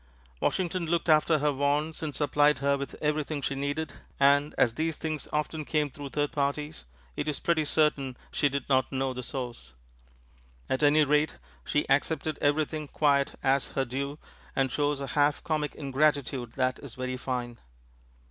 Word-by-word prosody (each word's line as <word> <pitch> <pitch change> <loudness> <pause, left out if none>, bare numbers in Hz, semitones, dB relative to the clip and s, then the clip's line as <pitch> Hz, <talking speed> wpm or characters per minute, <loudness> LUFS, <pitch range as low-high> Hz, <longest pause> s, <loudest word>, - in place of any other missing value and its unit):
Washington 180 - 0
looked 170 +1 0
after 155 +1 +5
her 150 0 +1
wants 145 +3 0
and 155 -3 -3
supplied 145 0 +3
her 140 0 +2
with 140 0 -5
everything 150 0 0
she 140 - 0
needed, 140 +2 -2 0.3
and, 140 +1 +4
as 115 - +4
these 160 +4 -1
things 155 -2 -3
often 150 +1 -1
came 150 -1 0
through 145 0 -7
third 145 +1 -1
parties, 145 - -2 0.3
it - - -3
is 150 -3 -1
pretty 170 -2 +2
certain 145 -4 +1
she 145 - +2
did 140 -1 -3
not 130 -2 +2
know 135 -1 -1
the 125 - -5
source; 120 - -6 0.9
at 130 - -1
any 150 +1 +5
rate 150 +1 +2 0.3
she 145 - 0
accepted 155 +3 +1
everything 150 +1 +1
quite 140 -1 +2
as 135 0 +1
her 135 - 0
due, 140 +3 -3 0.4
and 135 -2 +1
shows 145 +1 0
a 140 - -3
half 145 0 +2
comic 155 -2 -1
ingratitude 140 -3 0
that 130 -1 0
is 135 -5 -10
very 130 0 -3
fine. 125 -2 -4
145 Hz, 165 wpm, -28 LUFS, 135-150 Hz, 0.9 s, after